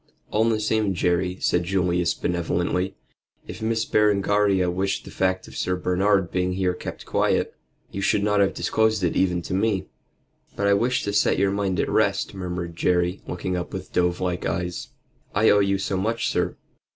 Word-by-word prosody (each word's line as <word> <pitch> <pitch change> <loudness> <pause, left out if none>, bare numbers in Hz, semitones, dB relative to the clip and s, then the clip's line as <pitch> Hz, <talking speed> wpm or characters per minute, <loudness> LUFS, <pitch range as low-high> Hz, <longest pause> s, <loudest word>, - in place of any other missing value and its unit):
"All 110 +2 +2
the 110 -1 +1
same, 105 -2 0
Jerry," 90 +1 0
said 90 - +2
Julius, 90 -1 +1
benevolently, 90 +2 -1 0.5
"if 110 - -8
Miss 110 0 0
Berengaria 100 -3 +2
wished 95 +2 -2
the - - -10
fact 95 0 -1
of - - -12
Sir 90 - -1
Bernard's 90 +1 +1
being 90 0 0
here 90 -1 0
kept 90 - -7
quiet, - - +1 0.4
you 100 - -4
should 100 +1 +2
not 105 0 +2
have 100 -1 +2
disclosed 110 -2 +1
it 85 - +1
even 90 -2 +1
to - - -5
me." 100 -1 +1 0.7
"But 100 - -1
I 100 - +5
wished 120 +5 +1
to 100 - -2
set 100 - +3
your 100 0 +2
mind 100 -2 -1
at - - +1
rest," - - +1
murmured 90 -3 -5
Jerry, 90 +1 +1
looking 90 +1 -3
up 90 -1 -4
with - - -7
dove 90 0 +1
like 90 -1 -2
eyes. 90 0 -3 0.5
"I 105 +2 +5
owe 105 - +5
you 100 -1 +2
so 95 0 -2
much, 110 +5 -1
sir." - - -1
95 Hz, 185 wpm, -24 LUFS, 90-100 Hz, 0.7 s, I